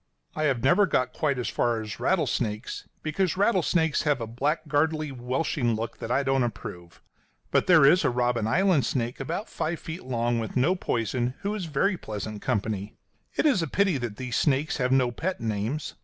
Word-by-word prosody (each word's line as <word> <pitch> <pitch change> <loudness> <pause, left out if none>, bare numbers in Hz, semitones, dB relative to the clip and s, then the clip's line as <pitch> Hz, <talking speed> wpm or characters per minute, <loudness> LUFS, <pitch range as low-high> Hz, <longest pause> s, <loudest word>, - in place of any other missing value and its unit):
I 155 - 0
have 130 -5 +1
never 185 +9 +5
got 125 -6 0
quite 145 -4 0
as 125 - -2
far 120 -1 0
as 110 -1 -6
rattlesnakes, 125 - -1 0.2
because 180 +4 0
rattlesnakes 180 -6 +2
have 145 -3 +1
a 115 - -3
blackguardly, 150 +4 0
welshing 125 -1 -1
look 115 +1 -5
that 115 - -5
I 135 +3 +2
don't 135 -1 +2
approve. 85 -8 -5 0.5
But - - +2
there 165 -6 +7
is 175 +6 +6
a - - +3
Robben 120 -2 0
Island 175 - +3
snake, 120 -1 -2
about 170 - -3
five 165 +1 -3
feet 165 +3 -7
long, 120 -2 0
with 115 +3 -4
no 135 +9 +3
poison, 120 - -1
who 200 +1 -1
is 205 -4 -3
very 170 +6 +1
pleasant 105 - -6
company. 105 0 -2 0.4
It - - +1
is 270 - +4
a 165 - -1
pity 190 -2 +1
that 120 -4 -4
these 125 -1 -4
snakes 145 +1 +1
have 125 -2 0
no 130 -2 +3
pet 180 +9 -3
names. 110 +6 -2
135 Hz, 185 wpm, -26 LUFS, 120-160 Hz, 0.5 s, there